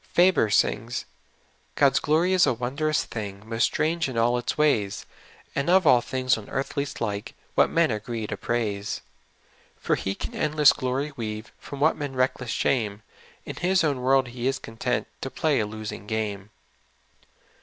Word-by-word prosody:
Faber 175 - +4
sings: 115 +3 +1 0.4
" - - -38
God's 140 -1 +4
glory 165 +5 +2
is 180 -4 +5
a 130 - +2
wondrous 140 +6 0
thing, 100 -3 -6
INIost 115 +1 -4
strange 160 +2 +1
in 125 - -5
all 120 +2 +3
its 120 - -3
ways, 120 -10 +1 0.5
And 140 +3 -1
of 185 0 +5
all 125 -4 +6
things 130 -2 0
on 105 - -12
earth 135 0 -3
least 140 0 -3
like 105 -2 -3 0.2
What - - +4
men 165 -4 +2
agree 110 +1 -3
to - - -4
praise. 105 -4 -2 0.4
" - - -33
For - - 0
He 95 0 -1
can - - -6
endless 150 -1 +4
glory 130 +3 -2
weave, 110 -2 -5
PYom 140 - -7
what 155 +2 +3
men 145 -3 -4
reckon 130 0 0
shame; 110 -3 0 0.4
In - - -7
His 180 0 +2
own 140 -5 0
world 130 0 +3
He 120 +1 -3
is 135 0 +1
content 125 +1 -2 0.2
To 135 - -3
play 155 0 +1
a 105 - 0
losing 105 -2 -7
game." 105 -2 -3
125 Hz, 175 wpm, -25 LUFS, 110-145 Hz, 0.5 s, all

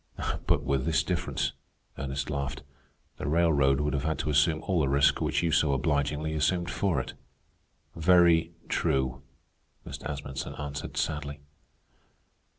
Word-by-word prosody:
"But - - +3
with 70 -1 0
this 80 -1 +2
difference," 90 0 -1 0.4
Ernest 70 +1 -4
laughed; 70 +1 -3 0.5
"the - - -4
railroad 75 -4 +3
would 75 -1 0
have 70 -1 -1
had 80 +1 -1
to 75 - 0
assume 80 +2 +3
all 95 -4 +1
the 70 -4 +2
risk 70 +1 +3
which - - 0
you 85 - +1
so 75 -3 +3
obligingly 75 +2 0
assumed 85 +3 0
for 85 -3 0
it." - - -5 0.8
"Very 85 -1 +4 0.2
true," 65 -1 0 0.6
Mr. - - -6
Asmunsen 70 -2 -5
answered 75 0 -6
sadly. 75 -2 -2
75 Hz, 140 wpm, -28 LUFS, 70-80 Hz, 0.8 s, Very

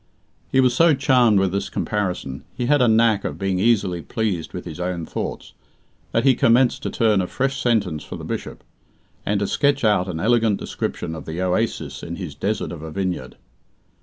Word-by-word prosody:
He 130 - +3
was 130 -2 +4
so 165 +1 +5
charmed 125 -6 +4
with 95 -2 +1
this 100 0 -2
comparison 90 -10 -3
he 125 - -2
had 145 +2 +3
a 125 - +5
knack 110 -2 +3
of - - -4
being 95 -2 -1
easily 100 -5 +2
pleased 95 -4 -2
with 90 - -7
his 85 -1 -8
own 90 -2 -3
thoughts - - -5 0.6
that 115 - +1
he 135 -1 +6
commenced 120 +1 +3
to - - -3
turn 110 -4 +2
a 90 - -2
fresh 135 +5 -2
sentence 100 - 0
for - - -8
the - - -8
Bishop, - - -5 0.6
and 105 0 +1
to - - +1
sketch 140 +5 +1
out 105 -4 +3
an 85 -3 -4
elegant 115 0 +2
description 80 - -4
of 80 - -8
the 80 +2 -5
oasis 95 +5 -1
in 85 - -6
his 85 -5 -6
desert 100 +8 -2
of 85 - -7
a 80 - -7
vineyard. 90 -7 -3
100 Hz, 195 wpm, -22 LUFS, 90-120 Hz, 0.6 s, he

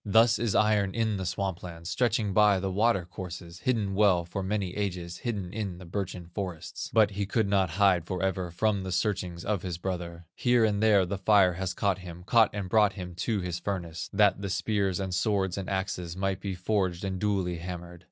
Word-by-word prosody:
"Thus 115 +2 +4
is 115 -3 0
iron 105 -2 +3
in 110 -3 0
the 95 -2 -3
swamp 95 -1 -2
lands, 85 -1 -8
Stretching 115 -5 +1
by 105 -1 +5
the 95 +1 -2
water 105 -2 +2
courses, 90 -1 -8
Hidden 110 -5 0
well 95 -4 +3
for 95 +3 -4
many 95 -1 -2
ages, 90 -4 -3
Hidden 105 -7 -4
in 100 -5 -3
the 90 - -11
birchen 90 0 -4
forests, 90 -6 -5
But 110 -2 +4
he 100 0 -2
could 110 0 +1
not 100 -2 +2
hide 90 -1 +3
forever 95 0 -1
From 100 +3 0
the 95 0 -5
searchings 90 -2 -1
of 105 -4 0
his 90 -3 -4
brother; 85 -2 -5
Here 120 -2 +3
and 105 -1 0
there 105 -4 +5
the 95 +2 -4
fire 100 -2 +5
has 95 +1 -3
caught 100 -2 +1
him, 90 -1 -9
Caught 115 +3 +4
and 100 -2 -3
brought 105 0 +4
him 90 -3 -7
to 105 +2 -1
his 90 -1 -3
furnace, 85 -3 -4
That 100 -2 +3
the 100 - -3
spears, 100 -1 0
and 95 -2 -3
swords, 95 -1 +1
and 95 -2 -4
axes, 95 -3 -3
Might 95 -1 -1
be 95 -1 -4
forged 90 -1 -1
and 95 -1 -3
duly 95 -4 0
hammered. 90 0 -7
95 Hz, 205 wpm, -28 LUFS, 90-105 Hz, -, by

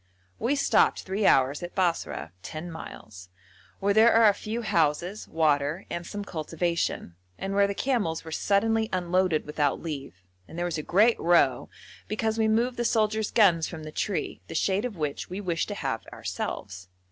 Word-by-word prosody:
We 265 +5 +1
stopped 280 - +3
three 195 +2 0
hours 135 +2 +3
at 175 0 -7
Basra 170 - -1
(10 160 - -7
miles), 100 - -10 0.5
where 200 +1 +2
there 220 +3 +6
are 225 -1 +6
a 205 - +6
few 220 +4 -5
houses, 170 +2 0
water, 155 +2 +1
and 170 0 -4
some 205 -1 -5
cultivation, 170 - -2 0.2
and 195 0 -4
where 200 0 +4
the 200 - -3
camels 205 -13 -1
were 160 - -8
suddenly 220 +5 +1
unloaded 180 -2 +1
without 150 -1 0
leave, 140 - -7 0.2
and 165 - -11
there 175 - -1
was 170 -3 -2
a - - -2
great 210 +9 +3
row 165 -7 +3 0.4
because 220 +1 -1
we 220 - +3
moved 235 +3 +1
the 240 - 0
soldiers' 220 -2 +1
guns 175 -8 +4
from 160 -3 -8
the 155 - -7
tree, 200 +4 -3
the - - -7
shade 200 +4 +1
of 225 -7 -5
which 150 -3 -3
we 185 +2 -5
wished 175 -5 -1
to - - -4
have - - -3
ourselves. 95 -1 -5
180 Hz, 180 wpm, -27 LUFS, 155-215 Hz, 0.5 s, there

